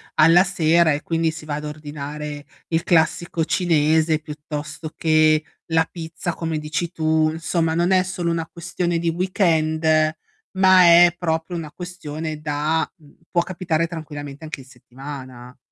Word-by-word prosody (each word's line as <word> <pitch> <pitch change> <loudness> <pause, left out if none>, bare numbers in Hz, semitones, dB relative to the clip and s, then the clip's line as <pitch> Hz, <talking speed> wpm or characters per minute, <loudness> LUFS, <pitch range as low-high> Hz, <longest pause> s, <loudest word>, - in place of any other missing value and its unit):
alla 165 +4 +6
sera 170 -3 +3
e 145 - -3
quindi 165 -1 0
si 155 -1 -10
va 145 -1 -3
ad 150 0 -5
ordinare 150 0 -6 0.2
il 165 0 0
classico 165 0 +1
cinese, 160 -2 +2
piuttosto 150 0 -7
che 155 -1 +3 0.2
la 160 0 +2
pizza, 170 0 -5
come 165 -2 -3
dici 160 +3 -3
tu. 155 -1 +1
Insomma, 165 0 -1
non 175 +2 +1
è 185 -1 +4
solo 180 -2 -3
una 165 -1 -1
questione 170 0 -2
di 170 - -3
weekend, 165 -3 0 0.7
ma 185 -1 +6
è 175 0 +7
proprio 165 0 -2
una 155 -3 -5
questione 160 -4 -6
da 150 +2 -1
mhmm, 150 -3 -21 0.2
può 170 - +3
capitare 170 -2 -1
tranquillamente 145 -3 -8
anche 155 -3 -6
in - - -15
settimana. 130 -1 -10
160 Hz, 150 wpm, -22 LUFS, 150-170 Hz, 0.7 s, è